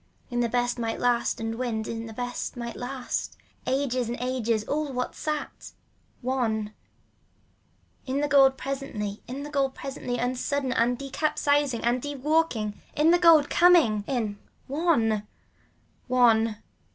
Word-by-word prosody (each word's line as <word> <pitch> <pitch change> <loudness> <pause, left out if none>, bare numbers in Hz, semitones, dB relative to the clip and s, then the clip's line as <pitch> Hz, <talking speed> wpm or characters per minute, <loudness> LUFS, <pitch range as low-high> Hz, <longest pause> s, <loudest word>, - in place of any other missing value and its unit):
In 240 - -1
the 240 -1 +1
best 245 +1 0
might 225 -1 -2
last 245 -1 +1
and 225 0 -2
wind 225 -3 -2
in 230 0 -4
the - - -8
best 245 +2 -4
might 235 -1 -5
last. 255 +1 -4 0.3
Ages, 255 -3 0
ages, 235 -2 -1
all 295 +4 -2
what 250 -1 -3
sat. 305 -1 -5 0.5
One. 225 -5 -1 1.3
In 265 +2 0
the 295 - +1
gold 270 -2 +5
presently, 255 -7 -4
in 270 +3 -5
the 295 - -7
gold 275 -2 0
presently 260 -2 -4
unsuddenly 255 +2 -1
and 240 +1 +2
decapsized 285 -1 0
and 240 +2 +1
dewalking. 290 -6 0 0.2
In 305 +3 +4
the 350 - +5
gold 325 -4 +6
coming 325 - +5
in. 220 -6 -2 0.3
ONE. 265 -8 +2 0.9
One. 230 -3 +4
250 Hz, 135 wpm, -26 LUFS, 230-280 Hz, 1.3 s, gold